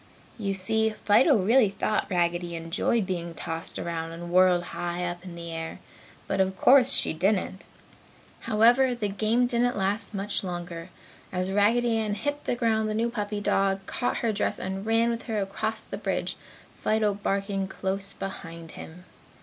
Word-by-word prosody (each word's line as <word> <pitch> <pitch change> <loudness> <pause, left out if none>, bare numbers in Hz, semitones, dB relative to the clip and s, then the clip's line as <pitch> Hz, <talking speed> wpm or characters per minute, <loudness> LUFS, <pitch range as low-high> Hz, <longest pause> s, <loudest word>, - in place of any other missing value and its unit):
You 200 -2 -1
see, 220 +3 +2
Fido 220 +6 +4
really 215 +3 +4
thought 210 +2 -1
Raggedy 175 -1 0
enjoyed 165 +6 0
being 170 -2 -4
tossed 165 +1 -4
around 165 -1 -3
and 170 +1 -7
whirled 180 -1 +5
high 175 0 -2
up 175 0 -5
in 180 -2 -9
the 170 0 -7
air. 165 0 -5 0.5
But 195 - 0
of 190 0 0
course 260 -1 +6
she - - +2
didn't. 190 +2 0 0.8
However, 245 +4 +5
the 210 -4 -2
game 220 +5 +2
didn't 245 0 +1
last 200 +2 -1
much 200 +1 -1
longer. 175 -1 -5 0.4
As 185 +1 -1
Raggedy 225 +4 +3
Ann 210 -2 -1
hit 290 +7 -3
the - - 0
ground 220 -3 +1
the 215 - -2
new 230 +2 0
puppy 210 -2 -3
dog 195 -1 +1
caught 245 - -2
her 225 - +2
dress 205 - 0
and 190 +2 -4
ran 230 +1 +3
with 230 0 -3
her 220 -3 -1
across 215 +3 -3
the - - -7
bridge, - - -2 0.4
Fido 215 -1 +1
barking 195 -1 -1
close 195 +1 -1
behind 170 -4 -7
him. 180 +3 -11
195 Hz, 165 wpm, -27 LUFS, 180-220 Hz, 0.8 s, course